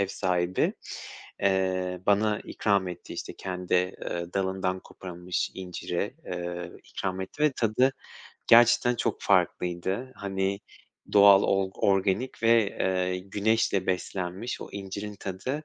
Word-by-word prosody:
ev 100 - +2
sahibi, 90 -1 0 0.7
eee, 95 -2 +1
bana 105 +1 +3
ikram 100 -3 +1
etti, 90 -1 -8
işte, - - -6
kendi, 90 -1 -3
eee, 90 -1 -1
dalından 95 -1 -1
koparılmış 90 -1 -4
inciri, 95 +4 -4
eee, 90 0 -4
ikram 95 -1 -4
etti 120 +10 -5
ve 150 -2 +4
tadı 125 +3 +2 0.5
gerçekten 120 +1 +6
çok - - -1
farklıydı. 95 +8 0
Hani, 95 0 -2 0.5
doğal 100 -1 +8
olg 95 -1 +1
organik 100 +6 +1
ve, 115 -2 +5
eee, 90 0 +1
güneşle 100 0 +1
beslenmiş 95 +4 -3
o - - -7
incirin 100 +1 -6
tadı, 130 +11 -4
95 Hz, 120 wpm, -27 LUFS, 90-105 Hz, 0.7 s, doğal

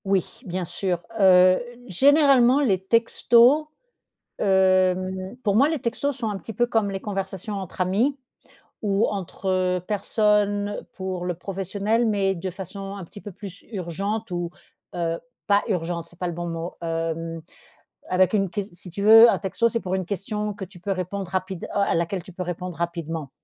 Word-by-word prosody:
Oui, 195 -2 +2 0.2
bien 180 -1 -3
sûr. 180 0 -2 0.2
Heu, 185 -1 +6 0.3
généralement 270 - +5
les 210 -10 +2
textos, 235 +6 +4 0.8
hem 185 0 +2
pour 200 -2 +2
moi 270 +7 +5
les 320 -1 -1
textos 255 +3 -2
sont 230 -3 -2
un 205 - -2
petit 225 - -8
peu 240 +3 +1
comme 225 -4 +1
les 195 - -3
conversations 195 0 -4
entre 190 -2 -7
amis 220 +10 +1 0.6
ou 200 0 +1
entre 185 -1 -1
personnes 205 0 +1
pour 185 -2 -4
le 180 0 -1
professionnel, 200 +5 -1
mais 195 -3 +1
de 185 +2 -4
façon 195 +2 -7
un 195 -2 -7
petit 205 - -12
peu 205 - -9
plus 190 0 -10
urgente 200 +4 -3
ou, 175 -1 -3 0.4
heu, 170 -1 -1 0.3
pas 200 0 +4
«urgente», 170 -3 -2
c'est 175 - -19
pas 180 - -2
le - - -3
bon 175 +1 -4
mot, 165 +1 -4
hem, 165 0 -3 0.7
avec 185 0 +3
une 195 -3 +1
ques 205 +2 -2
si 180 +1 -12
tu 185 +4 -6
veux, 220 +2 +9
heu, - - +7
un - - +1
texto, 210 +4 +1
c'est 230 0 -1
pour 185 -1 -2
une 190 -1 -2
question 210 +3 -3
que 200 - -8
tu 185 -1 -11
peux 195 +3 -3
répondre 185 0 -3
rapide 185 -1 -3
oh - - +2
à 200 - +2
laquelle 170 +2 -1
tu 185 - -12
peux 180 +1 -5
répondre 180 0 -5
rapidement. 165 -4 -4
190 Hz, 180 wpm, -24 LUFS, 180-210 Hz, 0.8 s, veux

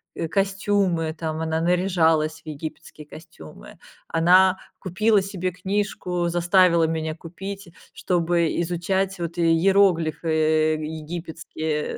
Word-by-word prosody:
э, 165 - -3
костюмы, 195 -4 0
там 160 -1 -4
она 160 0 -1
наряжалась 165 -3 +1
в - - -49
египетские 155 0 -8
костюмы. 155 - -13 0.3
Она 185 +3 +4 0.2
купила 205 +3 +2
себе 185 -2 -3
книжку- 185 -2 -2
заставила 175 0 +3
меня 160 -1 -2
купить- 195 +3 -8 0.2
чтобы 170 -1 0
изучать 190 +3 -1
вот 170 0 -5
иероглифы, 165 -2 +2
э, 155 0 +1
египетские, 160 -1 -5
170 Hz, 105 wpm, -23 LUFS, 160-190 Hz, 0.3 s, Она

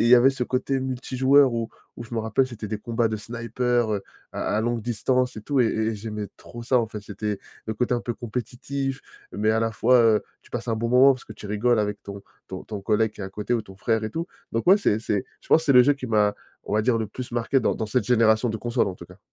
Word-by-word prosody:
il 115 - +3
y 125 - +9
avait 130 +3 +6
ce 135 -2 -4
côté 130 +2 -1
multijoueur 130 +1 +3
où 115 -1 -2 0.3
où, 120 - -7
je 115 - -8
me 115 - 0
rappelle, 110 +4 +1
c'était 110 -4 -7
des 110 0 -3
combats 115 +1 0
de 110 - -2
sniper, 115 +1 -1
heu, 100 -1 -2 0.3
à 105 - -1
à - - +2
longue 120 0 -1
distance 125 +2 0
et 105 - -7
tout, 140 0 +1
et 120 - +4
et 110 0 0
j'aimais 105 -1 -5
trop 120 0 -10
ça, 125 +1 +2
en 115 - 0
fait, 105 -1 -7
c'était 105 0 -4 0.3
le 110 - -2
côté 125 +2 0
un 120 - -1
peu 120 -1 -4
compétitif 130 +3 -4 0.3
mais 105 +1 +1
à 110 +1 +2
la 115 0 +1
fois, 125 +4 +4
heu, 110 -2 +4 0.2
tu - - -22
passes 120 0 -5
un 110 - +1
bon 115 +1 -1
moment, 130 +3 +7
parce 130 - -8
que - - -10
tu 105 - -10
rigoles 110 +3 +1
avec 105 0 -2
ton 100 0 -8 0.3
ton 95 -1 -6
ton 105 -2 -6
collègue 110 +1 +1
qui - - -13
est - - -3
à - - -5
côté 105 +5 -2
ou 115 - +1
ton 95 -2 -14
frère 110 +2 0
et 110 - -3
tout. 165 +6 -3 0.3
Donc 115 - -1
ouais, 195 - +9
c'est 110 - +2
c'est, 105 -3 -1 0.2
je - - -21
pense, 160 - +5
c'est 140 - +4
le 125 -1 +8
jeu 145 +3 +4
qui 130 -2 -7
m'a, 105 -2 +2 0.3
on - - -6
va 110 - +3
dire, 120 0 +2
le 110 -1 -1
plus 125 +1 -7
marqué 120 +3 +1
dans - - +1
dans 110 - -3
cette 125 +4 0
génération 115 -1 +3
de 110 - -2
console, 120 +1 0
en 95 - -5
tout 85 - -11
cas. 90 +3 -16
115 Hz, 280 wpm, -24 LUFS, 105-125 Hz, 0.3 s, y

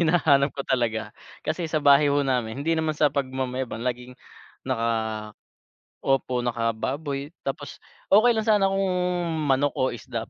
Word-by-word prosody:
hinahanap 145 -4 +4
ko 140 - -3
talaga. 110 -4 -1 0.3
Kasi 160 +1 -2
sa 155 -1 -1
bahay, 145 +1 +6
ho, 145 0 +2
namin, 125 0 -1
hindi 165 - +2
naman 160 -1 0
sa 150 -1 +3
pagmamayabang, 130 -3 -3
laging 125 0 -4 0.5
naka 110 -3 -2 0.7
opo, 130 -2 +1
naka-baboy. 135 +6 -2
Tapos, 140 +1 -5 0.3
okey 220 +4 +7
lang 220 - -1
sana 205 -3 +4
kung 195 0 0 0.6
manok 140 +2 +2
o 130 - +1
isda, 115 0 -6
135 Hz, 140 wpm, -25 LUFS, 120-150 Hz, 0.7 s, okey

